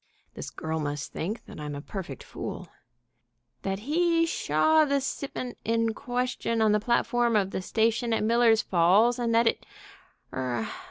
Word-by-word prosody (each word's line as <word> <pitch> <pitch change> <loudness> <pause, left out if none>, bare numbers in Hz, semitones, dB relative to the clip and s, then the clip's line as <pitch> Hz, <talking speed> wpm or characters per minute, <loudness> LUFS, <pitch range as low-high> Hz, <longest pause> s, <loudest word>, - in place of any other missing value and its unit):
(this - - -7
girl 160 0 -4
must 145 -2 -4
think 205 +8 -4
that - - -11
I'm 150 -1 -5
a - - -5
perfect 165 -5 -7
fool)... - - -7 0.9
that 195 +1 -3
he 330 +5 +2
shaw 315 - +3
the 280 -2 +1
sipment 265 -2 -5
in 230 0 +1
question 245 -2 -2
on 220 -1 +4
the 210 - +3
platform 240 +1 +1
of 195 -2 +2
the - - -3
station 225 +4 +1
at 225 - +1
Miller's 230 0 +4
Falls, 200 +8 +4
and 230 -1 +1
that 230 +1 +4
it 230 - +1 0.7
er 120 -4 -2
225 Hz, 160 wpm, -27 LUFS, 180-245 Hz, 0.9 s, on